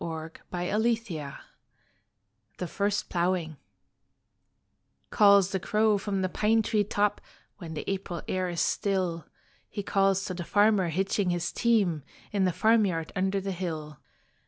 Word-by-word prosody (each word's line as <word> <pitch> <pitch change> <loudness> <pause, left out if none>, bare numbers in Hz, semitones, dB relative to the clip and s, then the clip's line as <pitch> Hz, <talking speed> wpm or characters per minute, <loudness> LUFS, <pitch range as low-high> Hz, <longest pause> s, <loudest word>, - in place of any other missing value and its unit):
Agnes 160 -1 -5 0.2
Maule 180 +4 -1
Machar 220 -11 -2 1.2
THE 180 - -3
FIRST 200 +3 -1
PLOUGHING 170 -3 0 1.5
Calls 200 -3 +5
the 190 - -1
crow 210 +2 +2
from 195 -1 -2
the - - +2
pine 220 +4 +2
tree 215 -1 +1
top 205 0 0 0.4
When 165 -4 -7
the 150 - -5
April 190 -3 -3
air 185 -1 -1
is 170 -1 -2
still. 185 -5 -1 0.4
He 205 - -5
calls 195 -1 +2
to 190 - -4
the 175 -1 -5
farmer 205 -1 +3
hitching 190 +3 0
his 175 -1 -1
team 205 -10 +2 0.3
In 200 -2 +1
the 185 - +2
farmyard 200 -6 +2
under 190 +1 +1
the 195 0 -3
hill. 160 -5 -5
190 Hz, 140 wpm, -28 LUFS, 175-205 Hz, 1.5 s, Calls